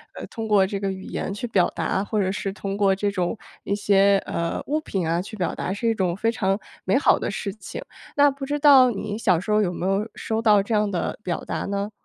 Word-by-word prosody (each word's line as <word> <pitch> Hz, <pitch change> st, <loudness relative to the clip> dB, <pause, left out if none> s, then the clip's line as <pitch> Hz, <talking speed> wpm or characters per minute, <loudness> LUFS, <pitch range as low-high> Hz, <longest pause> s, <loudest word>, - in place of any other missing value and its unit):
呃， -, -, -6 dB
通 225 Hz, -2 st, -5 dB
过 200 Hz, -3 st, +4 dB
这 200 Hz, +1 st, -3 dB
个 195 Hz, -1 st, -1 dB
语 190 Hz, 0 st, -5 dB
言 -, -, -4 dB
去 205 Hz, +4 st, -5 dB
表 190 Hz, -5 st, +2 dB
达， 165 Hz, +3 st, 0 dB
或 210 Hz, -1 st, 0 dB
者 190 Hz, 0 st, 0 dB
是 195 Hz, -1 st, -3 dB
通 195 Hz, -1 st, -4 dB
过 195 Hz, -2 st, +3 dB
这 200 Hz, +1 st, -1 dB
种 185 Hz, +2 st, -1 dB, 0.3 s
一 200 Hz, -, 0 dB
些， 200 Hz, -1 st, +4 dB
呃， 170 Hz, 0 st, -2 dB
物 305 Hz, +2 st, +1 dB
品， 190 Hz, -, -3 dB
啊， 170 Hz, +2 st, 0 dB
去 210 Hz, -, -9 dB
表 185 Hz, -4 st, -1 dB
达 185 Hz, -, -3 dB
是 230 Hz, +3 st, -1 dB
一 -, -, +3 dB
种 185 Hz, -5 st, 0 dB
非 225 Hz, +4 st, +1 dB
常 195 Hz, -4 st, 0 dB, 0.3 s
美 -, -, +3 dB
好 -, -, +4 dB
的 -, -, -2 dB
事 200 Hz, -3 st, -4 dB
情， 215 Hz, -, -8 dB, 0.3 s
那 285 Hz, 0 st, +5 dB
不 275 Hz, 0 st, -6 dB
知 290 Hz, +2 st, -1 dB
道 270 Hz, -4 st, +7 dB
你 210 Hz, 0 st, -4 dB
小 190 Hz, -6 st, +3 dB
时 210 Hz, -, -4 dB
候 210 Hz, -, +4 dB
有 180 Hz, -3 st, 0 dB
没 175 Hz, -, -4 dB
有 195 Hz, +3 st, 0 dB
收 220 Hz, 0 st, -2 dB
到 210 Hz, -3 st, +5 dB
这 225 Hz, -, -3 dB
样 210 Hz, -1 st, +2 dB
的 185 Hz, 0 st, -3 dB
表 180 Hz, -4 st, -3 dB
达 -, -, -3 dB
呢？ 200 Hz, +1 st, -2 dB
200 Hz, 275 characters per minute, -24 LUFS, 190-220 Hz, 0.3 s, 道